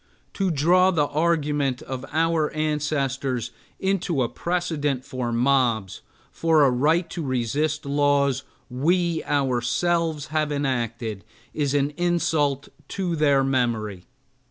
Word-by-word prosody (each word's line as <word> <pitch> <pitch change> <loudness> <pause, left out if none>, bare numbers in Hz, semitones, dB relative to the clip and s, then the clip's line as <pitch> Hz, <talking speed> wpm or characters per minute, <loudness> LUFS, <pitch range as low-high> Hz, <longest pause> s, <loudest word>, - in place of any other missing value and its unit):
To 195 -2 0
draw 175 +4 +4
the 160 -6 +2
argument 145 -4 0
of 130 -1 -6
our 160 0 +1
ancestors 140 -5 -1 0.3
into 185 -7 0
a 120 - -2
precedent 155 -7 -2
for 125 -2 -3
mobs, 120 -5 +1 0.3
for 160 -2 +3
a 135 - +4
right 155 +7 +2
to 170 - -4
resist 140 +3 -1
laws 140 -1 +2 0.3
we 165 +6 0
ourselves 145 +4 0
have 155 -1 +1
enacted, 120 -7 -2 0.3
is 145 -2 -1
an 140 0 +1
insult 160 -5 +1 0.2
to 180 -4 -2
their 145 -3 +3
memory. 115 -8 -1
145 Hz, 115 wpm, -24 LUFS, 130-160 Hz, 0.3 s, draw